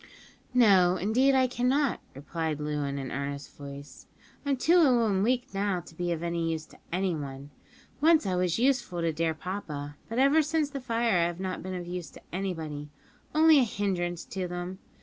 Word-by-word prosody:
"No, 190 -7 +5
indeed 250 +8 +3
I 260 -1 +5
cannot," 255 +2 +1 0.2
replied 155 +2 -3
Loo 150 -1 -2
in 140 0 -3
an 135 -2 -5
earnest 140 +1 -5
voice; 140 0 -10 0.4
"I'm 275 -1 +2
too 335 +7 +4
ill 250 -8 +5
and 195 -3 +1
weak 250 +2 0
now 195 -2 0
to 170 - -15
be 175 +1 -2
of 165 -1 -2
any 170 -1 -1
use 160 -1 -3
to - - -19
anyone. 145 -7 -3 0.5
Once 320 -4 +5
I 185 -2 0
was 180 -2 +1
useful 240 -8 +1
to 165 -1 0
dear 160 0 0
papa, 150 -5 -5
but 230 - -4
ever 275 +4 +5
since 305 -1 0
the 275 -1 -5
fire 230 -5 +1
I 170 - +3
have 175 0 -5
not 185 -1 -3
been 185 0 -5
of 175 -1 -5
use 175 -3 -5
to - - -13
anybody; 160 -6 -4 0.5
only 315 -1 +7
a - - +5
hindrance 180 -6 -2
to 185 -2 -4
them. 180 +1 -5
180 Hz, 190 wpm, -28 LUFS, 160-245 Hz, 0.5 s, only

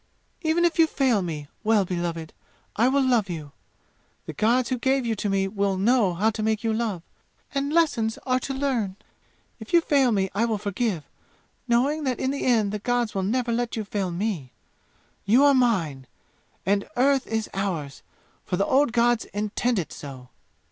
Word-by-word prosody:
"Even 335 +1 +2
if 340 0 0
you 325 - +7
fail 260 -9 +1
me, 155 -5 -5 0.2
Well 215 -3 +3
beloved, 170 -3 -4 0.4
I 230 +4 +3
will 275 +1 +3
love 230 -6 +2
you! 155 -4 -6 0.7
The - - -6
gods 235 +3 +2
who 255 -2 -1
gave 265 0 +1
you 230 - 0
to 205 - -2
me 195 0 +1
will 200 -1 -1
know 205 -2 +3
how 215 +6 +2
to 220 - -5
make 220 0 0
you 225 -1 +1
love; 220 -7 -2 0.5
and 280 +1 -1
lessons 260 -10 +1
are 255 -1 +2
to 270 - -4
learn. 250 -9 -1 0.6
If 220 +6 -11
you 340 - +8
fail 280 -6 +2
me 195 -3 0
I 215 +4 +1
will 225 -2 0
forgive, 200 -3 -2 0.6
knowing 270 +6 +2
that 255 -2 -1
in 260 - 0
the 280 - -3
end 220 -5 +3
the 210 - -3
gods 245 0 0
will 195 - -1
never 235 +5 0
let 240 0 -1
you 220 - -2
fail 200 -2 -2
me! 175 - -3 0.7
You 235 +7 +4
are 285 - +6
mine, 175 - +1 0.6
and 200 +1 0
Earth 270 +1 +3
is 220 -1 -2
ours, 170 -8 -3 0.4
for 180 - -2
the 200 - +2
old 270 -2 +2
gods 240 -1 +2
intend 215 +3 -1
it 175 - -3
so!" 130 -3 -10
220 Hz, 185 wpm, -25 LUFS, 195-255 Hz, 0.7 s, you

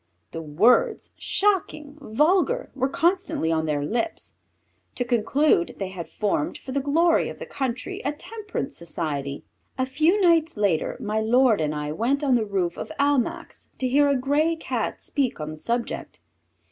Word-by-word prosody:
The 165 - -5
words, 230 - +2
shocking, 350 -8 0
vulgar, 355 - +1
were 265 0 0
constantly 345 - +1
on 160 -1 0
their 145 -2 0
lips. 240 - -3 0.6
To 245 - -1
conclude, 240 - +2
they 195 -2 -3
had 180 -3 -7
formed, 200 -8 -1
for 260 - -9
the 280 - 0
glory 325 +5 +2
of - - -8
the - - -7
country, 255 - -4
a 285 - 0
Temperance 415 -3 -6
Society. 150 -4 -4 0.3
A 260 - +1
few 310 +9 +2
nights 335 - +3
later 200 -6 +1
my 215 +1 -1
lord 230 -1 +3
and 150 0 -1
I 150 0 -3
went 250 - 0
on 270 -3 +3
the 235 -3 +2
roof 185 -4 -1
of - - -6
Almack's 290 +4 0
to 260 - -1
hear 285 +3 +4
a 280 - +3
grey 290 +5 +1
Cat 325 - -3
speak 270 - -1
on 155 0 -4
the - - -7
subject. 235 +9 -3
260 Hz, 165 wpm, -24 LUFS, 190-310 Hz, 0.6 s, hear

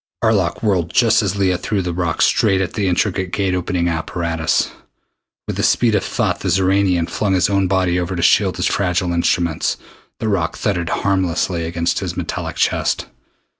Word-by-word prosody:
Arlok 100 -5 +1
whirled 90 -6 +1
just 115 -2 +4
as 100 -2 -1
Leah 95 -3 +1
threw 100 0 -1
the 90 -1 -3
rock 85 -2 0
straight 95 - +3
at 95 -4 -2
the 100 -3 -1
intricate 95 0 0
Gate 95 -2 0
opening 90 -1 -1
apparatus. 80 -2 -1 0.7
With - - -4
the - - 0
speed 120 -3 +3
of 105 - +1
thought - - -1
the - - -2
Xoranian 95 -2 +2
flung 100 -3 0
his 95 +2 +2
own 100 -1 +2
body 90 -1 +1
over 90 +1 -3
to 85 - -2
shield 95 -1 +3
his 90 - -1
fragile 90 -2 0
instruments. 85 -1 0 0.4
The 110 - -3
rock 90 -5 -1
thudded 90 -5 -1
harmlessly 90 -3 0
against 85 0 -1
his - - -5
metallic - - -4
chest. - - 0
90 Hz, 175 wpm, -19 LUFS, 85-100 Hz, 0.7 s, just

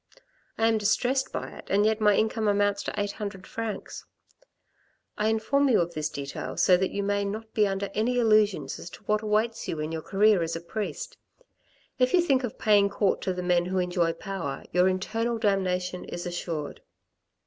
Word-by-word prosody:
I 225 - +2
am 225 -1 +3
distressed 250 +5 +1
by - - -4
it, - - -11
and 205 +2 +3
yet 220 0 +1
my 210 -1 +5
income 220 0 +1
amounts 205 0 +2
to 210 - -3
eight 205 0 -1
hundred 200 -3 -6
francs. 225 -2 -5 1.1
I 210 - 0
inform 270 +6 +2
you 235 - +4
of 170 0 -1
this 155 -1 -2
detail 140 -1 -6
so 185 - +5
that 185 +1 0
you 200 - -3
may 200 0 0
not 215 +2 -5
be 210 -2 +3
under 195 +1 -2
any 235 +4 0
illusions 215 -4 +2
as 175 - -8
to 205 - -13
what 210 +1 +1
awaits 220 +1 0
you 160 - -3
in 155 +1 -3
your 160 -1 -3
career 200 +1 +3
as 165 0 -2
a - - -3
priest. 215 - -5 0.8
If 255 +4 +3
you 355 - +5
think 275 -6 +2
of 245 - -4
paying 205 -2 +4
court 200 0 0
to 185 - -1
the 180 0 -4
men 175 -1 +2
who 185 +1 -2
enjoy 175 -2 +1
power, 190 -9 -5
your 180 +2 +4
eternal 225 +5 -1
damnation 185 -4 0
is 175 - -6
assured. 170 -3 -4
205 Hz, 195 wpm, -27 LUFS, 180-220 Hz, 1.1 s, my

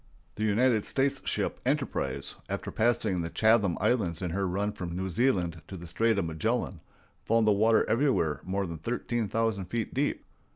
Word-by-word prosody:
The 105 - -4
United 110 +1 +3
States 135 0 +1
ship - - -1
Enterprise, - - -1 0.2
after - - -3
passing 110 -5 +1
the 85 - -3
Chatham 110 -2 +3
Islands 100 -6 0
in 90 - -2
her 95 +2 0
run 100 +3 -1
from 90 -5 -6
New 95 +1 -3
Zealand 90 -8 +1
to 95 - -7
the 85 - -9
Strait 110 +6 +1
of 100 - +1
Magellan, 80 -1 -2 0.4
found 115 0 +3
the 105 - +5
water 110 +2 +3
everywhere 115 - +1
more 95 +1 -1
than 85 -3 -6
thirteen 120 +2 -2
thousand 110 -2 0
feet 110 +4 -3
deep. 140 +2 -1
105 Hz, 175 wpm, -29 LUFS, 90-115 Hz, 0.4 s, the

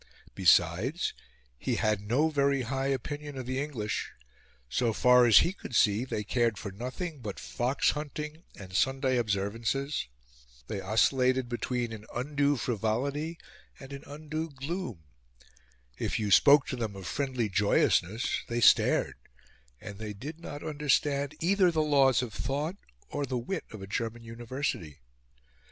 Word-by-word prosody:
Besides, 95 - +3 0.5
he - - -1
had 105 -2 +1
no 125 +10 +2
very 140 -2 +2
high 135 +3 -2
opinion 145 +2 -3
of 130 - -5
the 130 +2 -2
English. 120 -8 -3 0.6
So 115 - 0
far 125 +2 +5
as 110 -3 +7
he 175 - -1
could 130 - -8
see, 105 +3 +3
they 105 -5 -3
cared 115 0 +1
for 100 - -6
nothing 130 - -5
but 105 -5 -6
fox 125 +3 0
hunting 150 +1 -6
and 95 -2 -11
Sunday 135 +2 +2
observances; 115 - -1 0.6
they 105 -3 -4
oscillated 125 +5 +2
between 120 -1 -2
an 110 0 -9
undue 145 +3 +1
frivolity 130 +9 -1 0.4
and 135 0 -10
an 140 - -8
undue 155 +2 -5
gloom; 140 - -5 1.0
if - - -1
you 105 -2 -1
spoke 140 +6 +7
to - - -2
them 110 -5 -4
of 95 -1 -8
friendly 130 -1 -1
joyousness 105 +1 +2
they 120 0 -1
stared; - - +4 0.6
and 100 0 -9
they 105 -1 -5
did 150 +11 -8
not 145 -3 -8
understand 145 -1 0
either 185 +2 +4
the 160 -2 +1
Laws 135 -5 +4
of 115 -4 -6
Thought 145 - -2 0.3
or 145 - -2
the 130 -2 -2
wit 160 +10 -4
of 110 -3 -8
a - - -5
German 115 +3 -3
University. 115 - -4
130 Hz, 145 wpm, -29 LUFS, 110-145 Hz, 1.0 s, as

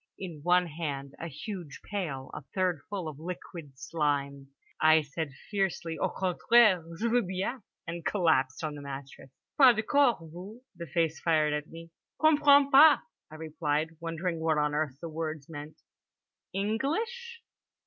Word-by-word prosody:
In 175 -5 -7
one 180 +3 +3
hand 145 -4 -5
a 170 - -5
huge 165 0 -7
pail 155 -10 -4
a - - -6
third 180 -5 0
full 190 -5 -4
of 150 -2 -7
liquid 165 -4 -8
slime. 140 -2 -2 0.3
I 155 0 +6
said 145 +2 -4 0.2
fiercely: 190 -5 -1
"Au - - +1
contraire, 190 +1 +3
je 230 - -1
veux 240 +1 +3
bien." 190 +6 -3 0.2
And 170 0 -6
collapsed 160 -8 +1
on 155 -1 -2
the 145 - -8
mattress. 135 -1 -9 0.3
"Pas 255 -4 +8
de 215 - -1
quart, 280 +1 +3
vous?" 175 +7 -10 0.2
the 170 0 -7
face 160 +2 0
fired 155 -3 +2
at 150 +1 -3
me. 165 0 -11 0.3
"Comprends 290 -2 +5
pas," 295 +2 +9 0.3
I 155 - -11
replied, 155 -1 -2
wondering 165 +1 -3
what 160 -1 +1
on 150 0 +1
earth 150 -3 -1
the 170 - -5
words 155 -2 -5
meant. 150 -1 -9 0.7
"English?" 390 - -2
165 Hz, 155 wpm, -29 LUFS, 150-200 Hz, 0.7 s, pas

